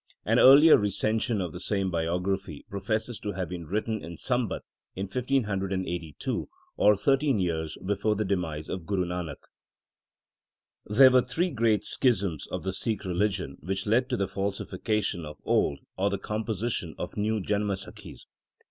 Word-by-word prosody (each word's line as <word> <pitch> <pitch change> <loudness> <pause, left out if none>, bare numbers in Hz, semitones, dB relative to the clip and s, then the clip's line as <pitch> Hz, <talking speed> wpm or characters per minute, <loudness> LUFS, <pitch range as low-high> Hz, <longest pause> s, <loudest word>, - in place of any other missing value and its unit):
An - - +3
earlier 145 +5 +9
recension 110 +2 0
of 85 -4 -4
the 90 - -6
same 95 -1 -1
biography 90 0 -2
professes 110 +4 -2
to 105 -1 -4
have 95 -1 -3
been 85 -3 -6
written 110 +3 -2
in 85 0 -8
Sambat 125 - -1 0.3
1582, 95 - -2 0.3
or 105 - +5
thirteen 135 +2 +2
years 80 -3 -2
before 105 +2 +1
the 105 +1 -1
demise 85 -6 -2
of 90 -3 -5
Guru 95 -3 0
Nanak. 90 -1 -5 1.4
There 130 +5 +7
were 125 0 +6
three 170 +8 -1
great 115 -5 +2
schisms 100 - 0
of - - -5
the 95 0 -2
Sikh 110 +1 -3
religion 95 -5 -1
which 95 +4 -3
led 120 +5 +2
to 125 - 0
the 100 - 0
falsification 100 -1 -2
of 75 0 -8
old, 70 - +2 0.2
or 100 +2 +2
the 100 - -1
composition 105 -4 -3
of - - -5
new 110 +1 0
Janamsakhis. 100 -1 -4
100 Hz, 150 wpm, -28 LUFS, 90-110 Hz, 1.4 s, earlier